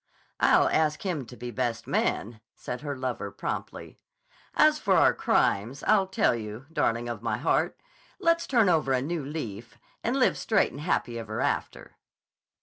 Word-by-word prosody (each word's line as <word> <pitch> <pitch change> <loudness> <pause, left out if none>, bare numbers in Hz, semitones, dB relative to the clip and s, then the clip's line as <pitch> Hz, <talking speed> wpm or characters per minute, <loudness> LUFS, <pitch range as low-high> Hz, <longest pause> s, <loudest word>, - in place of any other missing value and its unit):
"I'll - - +5
ask 150 -1 +1
him 155 -10 -2
to 125 - -12
be 120 0 -6
best 120 -1 -2
man," 110 +1 -1
said 125 - -6
her 145 -2 -4
lover 125 -5 -3
promptly. - - -6 0.6
"As - - +5
for - - +2
our - - +5
crimes, 115 +8 +1
I'll 200 -3 +3
tell 190 - +2
you, 110 +2 -6
darling 115 -5 0
of 120 -2 -5
my 115 - -1
heart; - - 0 0.4
let's 335 0 +2
turn 230 -6 +3
over 155 -6 +2
a 130 - +2
new 165 +1 -3
leaf 120 -6 -6 0.3
and 245 +4 0
live 260 - +2
straight 220 -3 +2
and 140 - -8
happy 120 -7 -1
ever 110 -1 -5
after." - - -3
130 Hz, 165 wpm, -27 LUFS, 115-165 Hz, 0.6 s, I'll